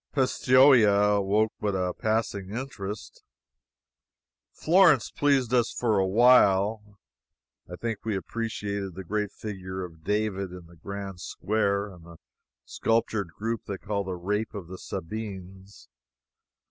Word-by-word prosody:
Pistoia 125 Hz, -6 st, +5 dB
awoke 105 Hz, +3 st, +1 dB
but 105 Hz, -2 st, -1 dB
a 90 Hz, -1 st, -1 dB
passing 110 Hz, -3 st, -2 dB
interest. 105 Hz, -4 st, -6 dB, 1.3 s
Florence 165 Hz, -, +4 dB
pleased 135 Hz, -4 st, +1 dB
us 120 Hz, -2 st, +3 dB
for 110 Hz, -5 st, +1 dB
a 95 Hz, -, +2 dB
while. 105 Hz, -2 st, +4 dB, 0.7 s
I -, -, -5 dB
think 110 Hz, +1 st, -4 dB
we 110 Hz, -2 st, -1 dB
appreciated 100 Hz, -2 st, -4 dB
the 95 Hz, -, -7 dB
great 105 Hz, +2 st, -2 dB
figure 95 Hz, -3 st, -6 dB
of 80 Hz, -2 st, -14 dB
David 105 Hz, -1 st, -1 dB
in 90 Hz, -1 st, -10 dB
the 85 Hz, +1 st, -17 dB
grand 100 Hz, +2 st, -7 dB
square, 100 Hz, -1 st, -1 dB
and 85 Hz, -2 st, -15 dB
the 85 Hz, 0 st, -13 dB, 0.5 s
sculptured 115 Hz, -3 st, 0 dB
group 115 Hz, +1 st, -3 dB
they 100 Hz, -, -4 dB
call 100 Hz, 0 st, -3 dB
the 95 Hz, -1 st, -4 dB
Rape 105 Hz, +5 st, -2 dB
of 100 Hz, -4 st, -6 dB
the 95 Hz, -, -8 dB
Sabines. 95 Hz, -, -7 dB
100 Hz, 130 wpm, -27 LUFS, 95-110 Hz, 1.3 s, Pistoia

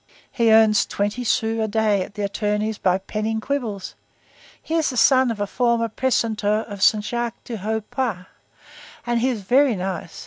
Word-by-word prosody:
He 230 Hz, -3 st, +2 dB
earns 220 Hz, -1 st, +5 dB
twenty 205 Hz, +5 st, -2 dB
sous 225 Hz, -1 st, 0 dB
a -, -, -1 dB
day 215 Hz, -2 st, +1 dB
at 200 Hz, +3 st, -7 dB
an 205 Hz, -, -2 dB
attorney's 210 Hz, +1 st, -2 dB
by 185 Hz, 0 st, +2 dB
penning 215 Hz, +3 st, -3 dB
quibbles. 225 Hz, -6 st, -4 dB, 0.7 s
He 320 Hz, -, -7 dB
is 325 Hz, -2 st, +2 dB
the 255 Hz, -, -5 dB
son 260 Hz, +1 st, +5 dB
of 225 Hz, -3 st, -4 dB
a 205 Hz, -, 0 dB
former 235 Hz, +1 st, 0 dB
precentor 220 Hz, -3 st, 0 dB
of 205 Hz, -3 st, -8 dB
Saint 210 Hz, +1 st, +4 dB
Jacques 235 Hz, 0 st, -3 dB
du 235 Hz, -, -6 dB
Haut 215 Hz, +2 st, -3 dB
Pas. 225 Hz, -9 st, -2 dB, 0.8 s
Ah! 240 Hz, -, -1 dB
he 240 Hz, +2 st, +1 dB
is 225 Hz, -6 st, -3 dB
very 255 Hz, +4 st, +3 dB
nice. 185 Hz, -3 st, -5 dB
220 Hz, 180 wpm, -22 LUFS, 205-240 Hz, 0.8 s, earns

